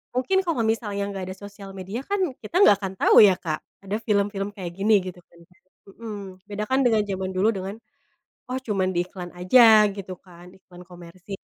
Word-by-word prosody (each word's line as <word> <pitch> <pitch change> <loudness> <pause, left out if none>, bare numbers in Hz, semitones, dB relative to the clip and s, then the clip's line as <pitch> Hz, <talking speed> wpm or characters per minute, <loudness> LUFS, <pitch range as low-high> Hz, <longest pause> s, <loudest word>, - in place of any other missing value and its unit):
Mungkin 320 +10 +1
kalau 320 -9 0
misalnya 210 -3 -1
nggak 195 -1 -5
ada - - -8
sosial 200 -1 -11
media 190 +5 -5
kan 405 - 0 0.2
kita 215 - -9
nggak 205 - +7
akan 190 -1 -4
tahu - - +4
ya 190 -3 +6
Kak 155 -3 -3 0.2
ada 195 +1 -3
film-film 200 -1 0
kayak 180 -3 -6
gini 210 +3 +2
gitu 180 -1 -8
kan? 170 - -23 0.6
Mmm. 220 -3 -6 0.3
Beda 205 +1 -4
kan 265 +1 +2
dengan 220 -3 +3
zaman 190 -1 -3
dulu 200 +4 +3
dengan 190 +2 -5 0.7
"oh 255 - -3
cuman 195 -6 -1
di 175 - +1
iklan 180 -1 -9
aja" 215 +2 +6
gitu 190 -2 -7
kan, 180 -1 -16
iklan 180 -1 -15
komersil. 180 +2 -10
200 Hz, 190 wpm, -24 LUFS, 185-215 Hz, 0.7 s, nggak